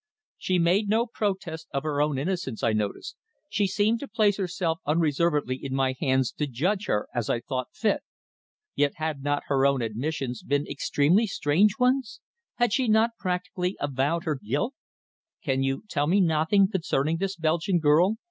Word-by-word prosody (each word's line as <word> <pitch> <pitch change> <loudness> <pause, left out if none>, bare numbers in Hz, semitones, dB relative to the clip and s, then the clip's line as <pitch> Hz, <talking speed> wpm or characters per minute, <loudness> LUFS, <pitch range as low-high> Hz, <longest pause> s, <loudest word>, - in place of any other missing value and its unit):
She 185 - 0
made 180 +5 +2
no 225 +3 +3
protest 190 -8 -3
of 140 -1 -2
her 150 -2 0
own 150 -2 +1
innocence, 150 - -3
I 115 - +2
noticed. 105 -2 -3 0.3
She 205 -1 +1
seemed 210 +4 +1
to 280 - -6
place 210 -6 +2
herself 175 -3 -1
unreservedly 150 -3 +1
in 135 -1 -3
my 135 -1 +1
hands 130 -4 +1
to 150 - 0
judge 185 - -1
her 105 - 0
as 120 -3 -2
I 120 - +1
thought 130 0 -4
fit. 215 -3 0 0.7
Yet 145 -1 +1
had 155 -4 -3
not 145 +1 -1
her 135 -2 +1
own 140 -3 +3
admissions 125 +2 -3
been 145 +1 0
extremely 150 +9 +2
strange 190 +4 +2
ones. 250 -2 +1 0.4
Had 240 -4 +1
she 260 -1 +1
not 220 +2 +4
practically 180 0 -2
avowed 145 +4 0
her 155 -6 -2
guilt? 145 - -1 0.7
"Can 135 -3 0
you 135 0 -1
tell 145 -6 0
me 190 +5 +3
nothing 170 +3 +3
concerning 160 -4 0
this 195 +2 -2
Belgian 165 +2 +1
girl?" 165 +6 +4
160 Hz, 170 wpm, -26 LUFS, 140-195 Hz, 0.7 s, not